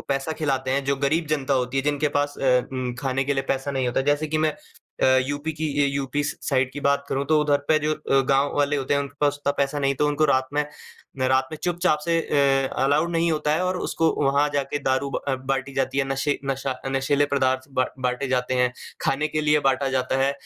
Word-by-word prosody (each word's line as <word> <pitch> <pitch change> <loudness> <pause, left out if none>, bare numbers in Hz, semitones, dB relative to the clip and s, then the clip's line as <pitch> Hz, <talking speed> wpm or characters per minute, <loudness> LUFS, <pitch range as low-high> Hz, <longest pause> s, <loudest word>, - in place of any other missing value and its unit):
पैसा 135 +3 -1
खिलाते 135 -3 0
हैं 140 +1 0
जो 140 0 +1
गरीब 160 +3 +1
जनता 140 -1 -1
होती 125 0 -1
है 135 - +2
जिनके 145 +1 0
पास 145 0 -1
अ, 125 -2 +3
उ 130 -1 -2
खाने 135 0 0
के 140 +1 0
लिए 135 - 0
पैसा 135 +1 -1
नहीं 135 -2 -1
होता। 125 - 0
जैसे 150 +2 -2
कि 155 - 0
मैं 155 0 +2 0.5
अ, - - +5 0.2
यूपी 145 +3 -3
की 155 +1 -3 0.2
ए - - +3
यूपी 140 +1 -1
साइड 130 -3 -1
की 145 - -6
अ, - - -7
बात 140 0 +2
करूँ 135 +1 -1
तो 155 +1 +3
उधर 145 -1 +2
पे 155 -1 +5
जो 155 0 0
अ, 145 -3 +1
गाँव 140 +1 +2
वाले 145 0 +2
होते 135 0 0
हैं 140 - +2
उनके 140 0 -6
पास 145 -1 +2
उतना 140 - 0
पैसा 140 +1 0
नहीं 140 -1 +1
हैं - - -8
तो 150 - +3
उनको 145 +1 +1
रात 130 -3 +2
में 150 0 +2 0.5
रात 130 0 +2
में 155 - -4
चुपचाप 175 -3 +1
से 170 -1 +2
अ, 135 -3 +2 0.2
अलाउ 145 +4 +3
नहीं 170 0 +1
होता 150 -1 0
है 170 - 0
और 185 0 0
उसको 165 -2 +1
वहाँ 140 +2 +3
जाके 140 0 -1
दारू 135 0 0
ब - - -2
अ, 135 - +2
बाँटी 135 +1 -3
जाती 135 +1 -1
है 140 - +2
नशें 135 +2 0 0.2
नशा 135 0 -2
अ, 130 +1 -7
नशीले 135 +2 +1
पदार्थ 130 -1 +1
ब 130 - +3 0.2
बाँटे 125 +2 -1
जाते 130 0 0
हैं। 125 -1 +2 0.3
खाने 150 +3 0
के 155 - -1
लिए 150 0 +3
बाँटा 135 +1 +1
जाता 130 0 0
है 135 +1 +2
140 Hz, 245 wpm, -24 LUFS, 135-150 Hz, 0.5 s, अ